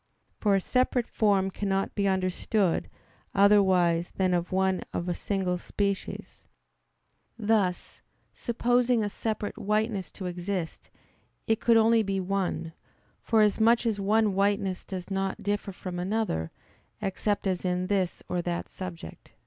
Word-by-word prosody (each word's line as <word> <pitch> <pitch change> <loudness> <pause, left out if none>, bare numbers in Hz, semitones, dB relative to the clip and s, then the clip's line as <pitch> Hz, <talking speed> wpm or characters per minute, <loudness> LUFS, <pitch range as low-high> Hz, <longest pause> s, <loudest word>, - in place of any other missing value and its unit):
For 205 -2 +3
a - - +3
separate 250 +3 +1
form 200 -4 +1
cannot 195 0 -1
be 200 -1 0
understood 190 0 0 0.5
otherwise 190 -4 +4
than 185 -1 +2
as 175 0 -1
one 190 0 +1
of 170 - -2
a 175 - 0
single 185 -2 -1
species; 200 +1 -4 0.9
thus, 210 -5 0 0.3
supposing 245 0 +1
a 205 - -1
separate 215 0 -3
whiteness 210 -2 0
to 190 - -7
exist, 180 -1 -4 0.6
it 225 -1 +1
could 230 -1 +5
only 225 0 +5
be 195 -2 -1
one; 185 -3 -2 0.5
forasmuch 225 +2 +3
as 220 -3 0
one 210 +1 +2
whiteness 195 -1 0
does 185 0 -6
not 195 0 -2
differ 205 0 -1
from 180 -1 -6
another 185 - -1 0.5
except 205 +2 -1
as 185 -2 -1
in 180 0 0
this 190 -2 -1
or 180 - -1
that 175 0 -3
subject. 170 - -9
195 Hz, 135 wpm, -28 LUFS, 185-215 Hz, 0.9 s, could